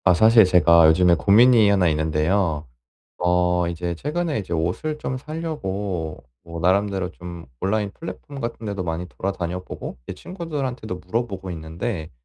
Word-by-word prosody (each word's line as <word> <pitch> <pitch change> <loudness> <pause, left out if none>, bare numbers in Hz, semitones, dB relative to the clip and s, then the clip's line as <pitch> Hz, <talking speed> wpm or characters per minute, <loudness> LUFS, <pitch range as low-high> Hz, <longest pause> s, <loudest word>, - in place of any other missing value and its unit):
아 90 -2 +5
사실 110 +2 +7
제가 85 -2 +6
요즘에 85 +2 +5
고민이 110 +4 +5
하나 95 -3 +3
있는데요. 80 +1 0 0.5
어 90 0 +2
이제 85 0 -3
최근에 155 - -2
이제 90 -4 -6
옷을 90 - -1
좀 130 - -3
사려고 100 - -4 0.2
뭐 85 -1 -7
나름대로 95 +1 +1
좀 85 -1 -10
온라인 105 +1 0
플랫폼 145 -2 -9
같은데도 105 -5 -4
많이 85 +1 -3
돌아다녀 90 -2 -4
보고 - - -7
제 - - -6
친구들한테도 135 - -5
물어보고 95 -3 -3
있는데 80 +2 -5
95 Hz, 340 characters per minute, -23 LUFS, 85-115 Hz, 0.5 s, 사실